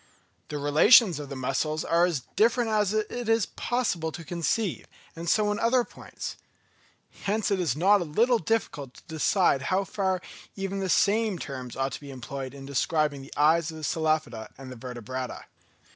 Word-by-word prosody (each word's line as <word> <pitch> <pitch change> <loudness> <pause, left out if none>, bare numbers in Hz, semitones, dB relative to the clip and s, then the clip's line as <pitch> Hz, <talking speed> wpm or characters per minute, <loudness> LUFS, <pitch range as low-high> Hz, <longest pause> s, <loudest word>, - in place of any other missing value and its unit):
The 150 - -4
relations 155 - +6
of 145 -2 -7
the 140 - -5
muscles 135 +4 -1
are 170 +1 +4
as 160 -7 -2
different 230 +2 +3
as 210 -2 +2
it 215 +2 -2
is 225 -2 +3
possible 190 -10 -2
to 165 - -7
conceive, 175 +4 -2 0.3
and 165 +1 -4
so 210 +1 +3
in 210 - -2
other 245 +2 +3
points. - - -8 0.9
Hence 210 +1 0
it 195 - +2
is 160 -8 0
not 195 +5 +4
a - - -2
little 230 +10 +2
difficult 145 - -2
to - - -16
decide 160 -2 +2
how 190 +2 +2
far 190 -1 -1 0.4
even 195 0 -3
the 190 -1 -2
same 210 +1 +2
terms 130 -6 -6
ought 135 0 -1
to - - -6
be 140 - -10
employed 135 +1 -6
in 135 -1 -9
describing 145 +1 0
the 135 - -12
eyes 155 +2 +4
of 160 - -7
the 155 - -9
Cephalopoda 155 -9 -1
and 130 -1 -9
Vertebrata. 125 +1 -6
165 Hz, 175 wpm, -27 LUFS, 140-205 Hz, 0.9 s, relations